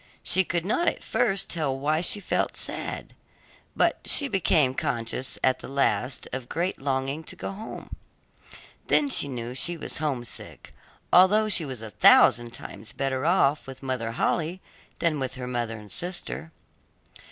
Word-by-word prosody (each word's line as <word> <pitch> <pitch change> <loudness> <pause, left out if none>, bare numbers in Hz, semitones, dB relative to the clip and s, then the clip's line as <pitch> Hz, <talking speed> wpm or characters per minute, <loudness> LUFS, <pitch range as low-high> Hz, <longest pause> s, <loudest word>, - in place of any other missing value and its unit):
She 190 - +3
could 170 -1 -2
not 290 - +1
at - - 0
first 195 -5 +1
tell 150 -6 -1
why 155 +4 0
she 195 +3 +3
felt - - -1
sad, - - -4 0.6
but - - +2
she 285 - +5
became 155 - +2
conscious 115 -2 -2
at 130 0 +2
last 135 -1 0
of 130 -2 -5
great 175 +1 -2
longing 135 +2 -1
to - - -5
go - - -5
home; 210 +3 -8 0.9
then 290 - +3
she 145 - +4
knew 120 -2 -5
she 170 +6 -1
was 150 - -6
homesick, 135 -6 -4 0.4
although 210 +4 +6
she 175 -5 +4
was 130 -5 -7
a 110 - -8
thousand 115 +5 +6
times 110 -1 -8
better 135 +1 -1
off 150 -6 +2
with 135 0 -10
Mother 125 -4 -2
Holle 165 +8 0 0.4
than 165 -4 0
with 130 -1 -3
her 130 -1 -6
mother 120 -2 -3
and 105 -1 -12
sister. 175 -2 -5
140 Hz, 155 wpm, -26 LUFS, 125-175 Hz, 0.9 s, although